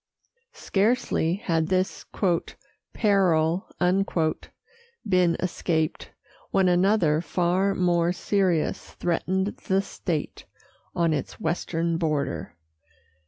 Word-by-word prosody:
Scarcely 200 -5 +1
had 165 -5 -1
this 185 +1 -1 0.8
"peril" 185 -4 +2 1.4
been 180 -3 +3
escaped, 160 -3 -1 0.4
when 190 -1 +2
another 180 -3 +3
far 180 +3 +1
more 175 -1 +2
serious 185 -3 0
threatened 190 +3 -1
the 195 +1 +2
state 170 -5 -4 0.5
on 170 -2 +2
its 140 -3 -4
western 165 0 -1
border. 145 - -2
175 Hz, 80 wpm, -25 LUFS, 165-190 Hz, 1.4 s, been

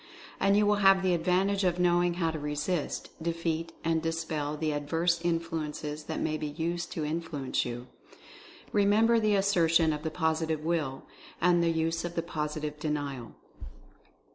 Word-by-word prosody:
And 195 +1 +4
you 210 - +4
will 205 0 +3
have 195 -1 +5
the 185 -1 +3
advantage 190 +4 +1
of 180 -1 +2
knowing 175 -1 +3
how 165 -2 0
to 160 - -5
resist, 150 +3 -2
defeat 165 0 -2
and 165 -1 +1
dispel 160 -2 -2
the 155 0 -1
adverse 165 +4 0
influences 160 -3 -3
that 160 - -3
may 155 -1 -1
be 150 - -3
used 165 +3 -3
to 155 - -2
influence 155 -4 -2
you. 120 0 -5 0.9
Remember 215 +3 +4
the 215 -2 +2
assertion 170 -5 +3
of 150 - -4
the 160 - -2
Positive 160 -1 -1
Will, 155 -6 -1 0.4
and 175 -1 +4
the 170 - +2
use 165 0 0
of 175 0 -5
the 165 - -1
Positive 150 -2 -4
Denial! 145 -6 -3
165 Hz, 160 wpm, -29 LUFS, 150-175 Hz, 0.9 s, have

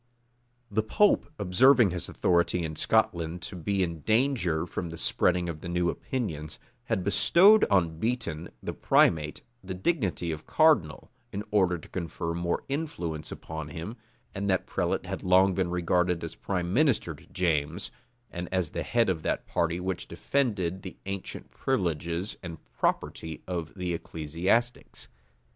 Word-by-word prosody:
The 110 +2 +2
pope, 145 - +3
observing 110 +3 +5
his 90 0 -4
authority 85 0 +2
in 80 -1 -4
Scotland 85 +2 +1
to - - -5
be 95 +3 0
in 85 -2 -3
danger 110 - +1
from 85 0 -4
the 85 - -7
spreading 90 +2 +2
of 80 -2 -5
the 85 - -6
new 85 0 +1
opinions, 80 - -4 0.3
had 95 - -1
bestowed 195 - +6
on 85 -4 +1
Beaton, 100 -8 -2
the - - -3
primate, 75 -2 +2 0.2
the 95 0 -5
dignity 95 - 0
of 80 0 -7
cardinal, 140 - +3 0.2
in 100 +1 -4
order 95 -4 +3
to 80 - -13
confer 85 -1 -4
more 85 0 -1
influence 135 - -4
upon 80 -1 -6
him; 85 +8 -6 0.4
and 100 0 -2
that 95 -1 +1
prelate - - -1
had - - -4
long 95 +1 +5
been 95 -1 0
regarded 90 0 +1
as 85 - -5
prime 90 -2 -3
minister 140 -1 +2
to - - -16
James, 85 -1 -1 0.4
and 90 0 -5
as 90 -4 0
the - - -3
head 115 -1 +2
of 90 -4 0
that - - -1
party 85 +1 0
which 90 -1 -3
defended 100 -10 -1
the 95 - -9
ancient 100 -1 -6
privileges 85 - -1
and 85 -3 -7 0.2
property 80 -1 -2
of 85 -3 -3
the 90 -2 -2
ecclesiastics. 85 - -1
90 Hz, 155 wpm, -28 LUFS, 85-100 Hz, 0.4 s, bestowed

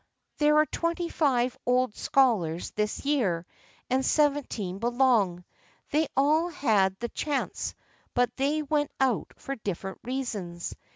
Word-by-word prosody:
There 300 0 +4
are 305 - +6
twenty 335 +2 -2
five 255 -6 +1
old 250 -2 +1
scholars 195 -12 +2
this 210 +5 -2
year, 205 - +1 0.4
and 260 +1 +1
seventeen 270 - +1
belong. 235 -7 +2 0.5
They 310 +1 +2
all 310 +5 +3
had 210 - +2
the 235 +2 -4
chance, 295 +3 -2 0.4
but 245 0 +2
they 290 +3 0
went 295 0 0
out 260 -4 +1
for 275 - -5
different 195 -2 -5
reasons. 210 -10 -4
255 Hz, 125 wpm, -28 LUFS, 205-290 Hz, 0.5 s, are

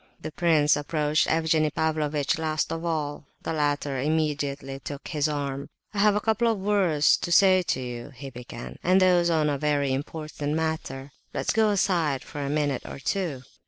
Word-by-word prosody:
The - - -6
prince 155 -3 +3
approached 150 +1 +1
Evgenie 160 -1 +2
Pavlovitch 150 -2 0
last 155 -1 -1
of 165 0 -5
all. 150 -4 -3 0.2
The - - -2
latter 145 -3 0
immediately 145 -2 -1
took 140 +1 -7
his 150 -3 +1
arm. 140 -2 -3 0.2
"I 205 - -3
have 210 0 +5
a - - +2
couple 225 +2 +2
of 220 - -2
words 190 -7 +3
to 175 - -4
say 185 +1 +6
to 165 - -1
you," 120 0 -6
he 135 +2 -8
began, 120 -1 -9
"and 185 +2 +4
those 180 -2 +4
on 160 -2 +2
a 145 -2 0
very 145 -2 +1
important 150 +1 -4
matter; 155 -4 -3 0.2
let's - - 0
go 220 -1 +3
aside 170 -9 +1
for 145 - -7
a 140 - -2
minute 145 -3 0
or - - -8
two." 140 0 -2
150 Hz, 180 wpm, -26 LUFS, 140-170 Hz, 0.2 s, say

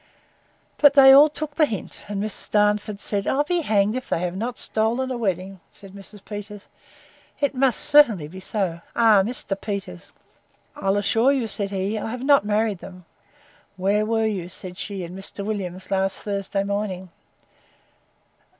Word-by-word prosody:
But 290 -1 +6
they 270 -1 +9
all 285 +3 +8
took 300 0 -6
the 310 -2 +4
hint; 210 -7 -7
and 205 -1 -4
Miss 210 0 -2
Darnford 210 0 +1
said, 200 -1 -1
I'll 285 +2 +2
be 350 +4 0
hanged 210 -5 +1
if 255 - -5
they - - +1
have 180 0 -3
not 235 +5 -4
stolen 235 +4 -1
a - - -2
wedding! 190 -4 -3
said 195 -1 -13
Mrs. 200 0 -13
Peters, 205 -1 -8 0.7
It 285 -1 0
must 260 -2 +1
certainly 240 - +4
be 185 +5 -10
so! 190 -4 -3
Ah! 220 -4 +5
Mr. 210 -1 0
Peters. 195 - -6 0.6
I'll 195 +1 0
assure 225 +5 +2
you, 260 -5 0
said 200 -2 -1
he, 200 +2 -2
I 220 - -4
have 250 +2 -6
not 280 -5 +4
married 210 -1 0
them. 180 -1 -12 0.7
Where 200 +3 +1
were 225 +1 0
you, 190 -5 -3
said 180 0 -6
she, 195 0 -5
and 175 +1 -8
Mr. 195 +1 -6
Williams, 190 -3 -5
last 195 0 -1
Thursday 200 -1 -2
morning? 200 -2 -3
205 Hz, 170 wpm, -23 LUFS, 195-230 Hz, 0.7 s, they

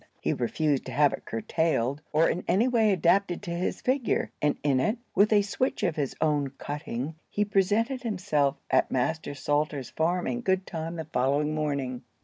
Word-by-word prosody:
He - - 0
refused 140 +3 0
to - - -5
have 145 +1 +4
it - - -7
curtailed, 140 +2 0
or 160 +2 +4
in 180 - -1
any 215 +7 +3
way 225 -4 +3
adapted 180 +1 +2
to 175 - -5
his 175 +2 -2
figure, 255 -1 0
and 150 0 +2
in 140 -3 +3
it, 210 - +1 0.2
with 205 +3 +4
a 205 -1 +5
switch 255 +7 -1
of 170 -5 +1
his 145 -4 -2
own 150 -3 +1
cutting, 145 -1 -4 0.2
he 210 - 0
presented 210 +6 +1
himself 180 - 0
at - - +3
Master 145 +3 -1
Salter's 145 -1 -1
farm 175 +3 0
in 245 - -2
good 190 -3 +1
time 165 0 -5
the 160 -1 -5
following 145 +1 +1
morning. 140 -5 -2
160 Hz, 180 wpm, -27 LUFS, 145-195 Hz, 0.2 s, a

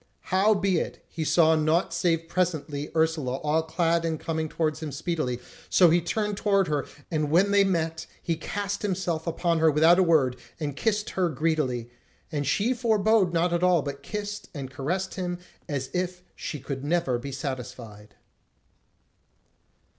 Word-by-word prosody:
Howbeit 195 -2 +2
he 160 - -4
saw 160 0 +4
naught 155 +3 +1
save 165 -2 +1
presently 160 -5 -1
Ursula 160 -5 +1
all 150 +3 +1
clad 165 +1 +1
and 160 -2 -1
coming 160 -1 -2
towards 155 -1 -1
him 155 -2 -4
speedily; 155 -4 -2 0.3
so 175 -3 +6
he 175 +1 +4
turned 210 +4 -1
toward 195 -3 +2
her, 145 -2 -1 0.2
and 155 -2 0
when 185 +6 +4
they 200 0 +5
met 165 -4 -1
he 165 - -1
cast 200 +4 -3
himself 180 -5 -2
upon 170 0 +1
her 160 0 +5
without 160 +4 +5
a - - +6
word, 145 -7 +3 0.2
and 145 -3 -3
kissed 210 +4 0
her 185 -2 +1
greedily; 150 -7 -1 0.4
and 145 -3 -2
she 210 - +2
forbore 220 -5 +3
not 170 +1 +1
at 170 - +1
all, 180 -4 +4
but 140 -1 -5
kissed 205 +5 -5
and 135 -2 -5
caressed 175 +8 -2
him 180 -2 -3 0.3
as 135 -3 -3
if 180 0 -2
she 150 - -5
could 135 0 -5
never 145 -5 +1
be 140 +3 -6
satisfied. 125 -6 -6
165 Hz, 160 wpm, -26 LUFS, 145-185 Hz, 0.4 s, so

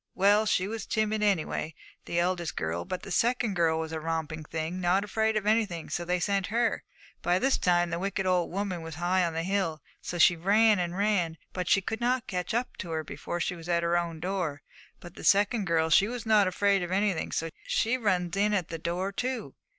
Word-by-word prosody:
Well, 205 +3 +4
she 185 -2 +1
was 220 -1 -5
timid, 215 -1 0
anyway, 170 -5 0 0.3
the 170 - -3
eldest 175 -1 0
girl. 80 +2 -2
But 185 - -5
the 195 - -8
second 240 0 +1
girl 165 -3 +2
was 160 0 -4
a 160 - -3
romping 160 -1 -3
thing, 160 +4 -4
not 185 +3 +2
afraid 220 +1 0
of 210 - -2
anything, 210 -6 0
so 175 - -2
they 180 +1 0
sent 195 +1 0
her. 230 +2 0 0.4
By 175 +1 +2
this 265 +7 +1
time 175 -1 +2
the 170 - -2
wicked 195 +1 -2
old 180 -2 +2
woman 190 -2 -3
was 160 -2 -7
high 180 +3 +1
on 170 -1 -1
the 165 +1 -2
hill; 185 -4 -1 0.2
so 175 - -5
she 175 +1 +6
ran 205 +4 +4
and 175 0 -2
ran, 195 -6 +1 0.2
but 180 -2 -3
she 195 - +4
could 225 +4 -4
not 250 +1 +1
catch 180 -2 -3 0.3
her 160 -4 -3
before 175 +3 -5
she 180 +2 -1
was 165 0 -10
in 175 - +2
at 170 - 0
her 170 0 +1
own 170 -2 -1
door; 175 -5 -3 0.4
but 175 -1 -11
that - - -11
second 205 +2 +3
girl, 160 -1 +1
she 195 +5 +6
was 240 0 -5
not 215 -3 +4
afraid 200 +1 +2
of 175 0 -4
anything, 195 -3 0
so 165 0 -2 0.2
she 230 +3 +1
runs 185 -7 0
in 205 +1 +2
at 185 -5 -1
the 165 - -5
door, 180 +4 -2
too. 250 +4 -3
185 Hz, 220 wpm, -28 LUFS, 170-205 Hz, 0.4 s, she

